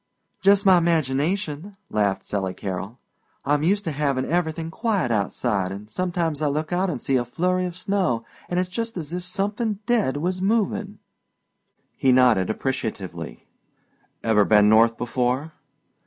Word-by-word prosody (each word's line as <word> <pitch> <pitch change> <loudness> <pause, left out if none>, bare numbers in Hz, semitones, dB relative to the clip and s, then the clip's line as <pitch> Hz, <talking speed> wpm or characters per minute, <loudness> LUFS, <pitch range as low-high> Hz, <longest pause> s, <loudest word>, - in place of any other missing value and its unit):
"Just 200 +1 +4
my 185 -2 +7
imagination," 165 +3 -1
laughed 100 -2 0
Sally 95 -2 -3
Carroll 95 +4 -5 0.5
"I'm 145 +1 +2
used 200 +6 +2
to 165 - -2
havin' 140 -3 0
everythin' 165 -1 -1
quiet 200 - 0
outside 100 -2 0
an' 100 +2 -8
sometimes 170 +1 -2
I 150 - +2
look 155 +4 -2
out 185 +2 +1
an' 155 - -2
see 130 +2 0
a 120 - +1
flurry 180 +8 0
of 175 0 -8
snow 185 -13 0 0.2
an' 175 - -1
it's 180 0 +1
just 225 +3 -4
as 160 -1 -5
if 180 0 -3
somethin' 205 +4 -2
dead 220 - +1
was 180 +4 -2
movin'." 210 0 0 1.0
He 135 -3 +3
nodded 125 -7 +4
appreciatively. 95 - -4 0.8
"Ever 110 -2 +4
been 105 0 +5
North 115 +2 +5
before?" 125 +5 -1
155 Hz, 150 wpm, -24 LUFS, 115-185 Hz, 1.0 s, my